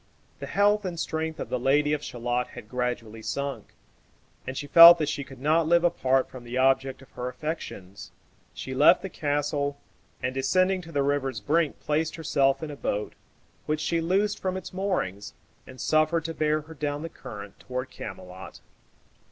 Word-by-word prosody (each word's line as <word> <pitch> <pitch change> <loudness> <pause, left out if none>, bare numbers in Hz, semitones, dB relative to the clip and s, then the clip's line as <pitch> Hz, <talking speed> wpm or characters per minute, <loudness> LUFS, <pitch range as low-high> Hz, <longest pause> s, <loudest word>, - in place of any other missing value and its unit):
The - - -6
health 205 +1 +3
and 175 -3 -4
strength 160 0 -3
of - - -5
the 125 - -1
Lady 145 +4 +2
of 150 0 -2
Shalott 120 +1 -2
had - - -9
gradually 120 -3 -3
sunk, 140 +4 -4 0.7
and 130 - -4
she - - -3
felt 170 +4 +10
that 155 -3 -1
she 140 - -3
could 135 0 -13
not 155 +4 +2
live 170 +1 +4
apart 135 -6 +2
from 130 -2 -11
the 120 +1 -5
object 135 0 +2
of 135 - -20
her 125 - -5
affections. 125 - -6 0.5
She - - -6
left - - +5
the - - -4
castle, 145 -1 -1 0.5
and 125 +1 -1
descending 185 +8 +2
to 165 -1 -12
the 140 -3 +1
river's 135 -4 -1
brink 155 +8 0
placed 155 +1 -1
herself 140 -3 +1
in 155 - -4
a - - -7
boat, 105 -6 -3 0.5
which 155 0 0
she 165 +1 0
loosed 195 +5 +1
from 185 0 -2
its 190 - -8
moorings, 180 - -2 0.3
and 130 0 -12
suffered 155 +4 +2
to 165 - -3
bear 155 -1 +1
her 160 +2 -12
down 145 0 -3
the - - -3
current 105 -10 -10
toward 125 +1 -5
Camelot. 95 -2 -9
145 Hz, 180 wpm, -26 LUFS, 130-160 Hz, 0.7 s, felt